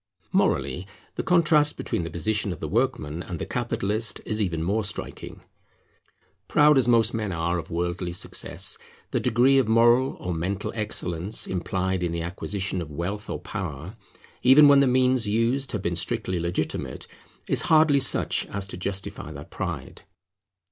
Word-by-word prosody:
Morally, 95 +2 0 0.3
the - - -3
contrast 155 -4 +3
between - - -2
the 85 - -4
position 100 +5 -1
of 90 - -6
the - - -4
workman 75 +3 -1
and 90 -1 -6
the - - -4
capitalist 110 +3 -1
is 110 0 -1
even 85 -5 -1
more 105 +6 0
striking. 100 - -6 1.1
Proud 150 0 +5
as 125 - +2
most 115 -2 +4
men 105 -3 -2
are 85 +1 -1
of - - -8
worldly 85 +1 -2
success, 90 - -3 0.3
the - - +1
degree 130 +4 +4
of 130 - +1
moral 120 +3 +4
or 90 - -3
mental 95 +5 -3
excellence 100 -3 -2
implied 95 0 -2
in 85 -1 -1
the 85 0 -3
acquisition 95 +1 -3
of 75 -3 -7
wealth 95 +7 -4
or - - -3
power, 90 - -6 0.5
even 135 +4 +7
when 140 -1 +7
the 140 - +4
means 125 -2 +3
used 115 +5 +1
have 105 -3 -3
been 85 -3 -1
strictly 90 +2 -1
legitimate, 85 -1 -3 0.4
is - - +3
hardly 155 -3 +5
such 135 - +1
as 100 -1 -3
to 100 - -6
justify 95 +2 -5
that - - -10
pride. - - -5
100 Hz, 160 wpm, -25 LUFS, 85-120 Hz, 1.1 s, even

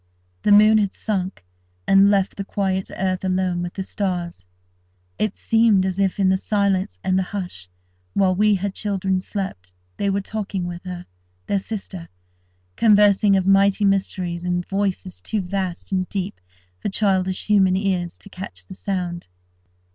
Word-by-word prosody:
The - - +2
moon 215 +1 +7
had 200 -2 -1
sunk, 190 - -3 0.4
and 195 +1 +6
left 200 -1 +1
the 200 - -4
quiet 190 -1 -1
earth 185 0 -1
alone 185 -1 0
with 175 0 -5
the 190 - -3
stars. 175 - -3 0.7
It 215 -2 0
seemed 225 -4 +3
as 190 0 -2
if, 195 0 +1
in 190 -1 +4
the 190 0 +2
silence 200 -1 0
and 190 0 +2
the 185 - -3
hush, 175 - -6 0.4
while 190 -2 +3
we 210 +2 +3
her 195 +1 -2
children 190 -2 -1
slept, 95 - -5 0.2
they 200 - 0
were 195 0 +1
talking 195 -3 -4
with 175 +1 -7
her, 180 -1 -6 0.4
their 200 - 0
sister—conversing 185 - 0
of 190 - 0
mighty 195 +1 +4
mysteries 185 -3 0
in 180 0 -1
voices 195 -1 -3
too 215 - -2
vast 185 -1 -3
and 185 -1 0
deep 195 - -4 0.4
for - - -2
childish 190 -2 +1
human 195 -3 +4
ears 185 -3 -1
to 200 - -7
catch 185 +1 -8
the - - -10
sound. 180 - -4
190 Hz, 155 wpm, -22 LUFS, 180-200 Hz, 0.7 s, moon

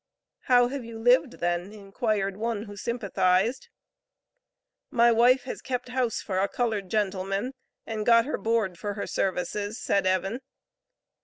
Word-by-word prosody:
"How 245 -1 +5
have 275 -1 -5
you 230 -1 -8
lived 245 +3 +3
then?" 175 +2 -2
inquired 200 -1 -2
one 220 0 -2
who 205 -2 -10
sympathized. 200 +1 0 1.2
"My 235 0 +4
wife 245 +3 +4
has 255 - -6
kept 250 -1 -4
house 250 -2 -1
for 185 -2 -2
a 195 - +2
colored 215 -5 -2
gentleman, 195 +3 -1 0.3
and 220 -1 -3
got 230 +1 +5
her 300 - -3
board 220 -6 0
for 205 -1 -4
her 205 - -3
services," 205 +3 -2
said 195 -2 +1
Evan. 190 +5 0
215 Hz, 145 wpm, -27 LUFS, 195-240 Hz, 1.2 s, How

